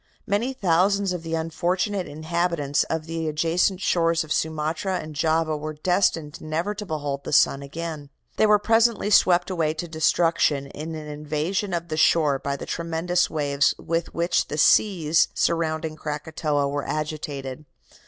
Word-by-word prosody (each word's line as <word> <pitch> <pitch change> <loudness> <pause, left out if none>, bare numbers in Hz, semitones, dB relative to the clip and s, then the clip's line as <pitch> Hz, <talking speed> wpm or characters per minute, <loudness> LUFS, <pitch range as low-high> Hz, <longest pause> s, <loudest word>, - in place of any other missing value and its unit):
Many 215 +6 0
thousands 195 -2 +2
of 175 - -4
the 165 0 -3
unfortunate 180 +4 -1
inhabitants 155 -2 -1
of 160 -1 -3
the 165 0 -3
adjacent 170 +5 +1
shores 165 -2 +2
of 155 - -2
Sumatra 160 +4 -1
and 155 -3 -7
Java 160 +1 +1
were 155 +1 -5
destined 165 -2 0
never 165 +6 -2
to 210 -1 -7
behold 145 -4 -3
the - - -6
sun 140 -1 +4
again. 155 0 -6 0.3
They 215 - +4
were 210 0 +6
presently 225 0 +2
swept 180 -2 +4
away 160 -3 0
to 170 +2 -4
destruction 160 -2 +2
in 155 +3 -7
an 155 -1 -7
invasion 150 +7 -2
of 170 -1 -3
the 155 - -3
shore 150 -3 +3
by 140 0 -2
the - - -7
tremendous 170 +2 -1
waves 145 -2 +1
with 165 0 -2
which 170 +1 0
the 150 - -5
seas 165 -1 +4
surrounding 160 -1 0
Krakatoa 150 -1 -2
were 145 0 -2
agitated. 150 -2 -4
160 Hz, 155 wpm, -24 LUFS, 150-175 Hz, 0.3 s, were